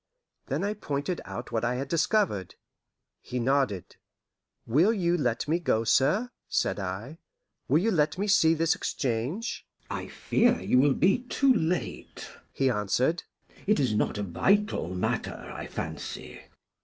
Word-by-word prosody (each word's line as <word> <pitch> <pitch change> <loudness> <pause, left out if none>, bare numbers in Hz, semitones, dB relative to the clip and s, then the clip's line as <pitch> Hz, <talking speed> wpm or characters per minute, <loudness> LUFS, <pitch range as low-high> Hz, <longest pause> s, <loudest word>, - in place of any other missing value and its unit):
Then - - -1
I 205 +1 0
pointed 150 -3 -3
out 120 - -7
what 115 - -1
I 120 +1 +1
had 135 +2 -3
discovered. 165 - +1 0.7
He 125 - -5
nodded. 125 - 0 0.7
"Will 155 - +4
you 175 -6 +1
let 125 -7 -1
me 165 +3 +1
go, 130 -9 +1
sir?" 155 - +2 0.2
said - - 0
I. - - -5 0.5
"Will - - +4
you 215 +7 +2
let 150 -3 +1
me 200 - 0
see 165 -5 +5
this 165 +1 +2
exchange?" 135 - -2 0.3
"I - - -4
fear 240 +1 +2
you 125 - +3
will 140 0 +4
be 195 +7 +3
too 270 +1 +3
late," 175 -5 -3 0.2
he 135 - 0
answered. 125 - +1 0.5
"It 210 -5 +3
is 130 -6 +1
not 105 - 0
a 105 - -2
vital 195 - +1
matter, 90 - -1 0.2
I - - -6
fancy." 65 -1 -6
150 Hz, 150 wpm, -28 LUFS, 120-195 Hz, 0.7 s, see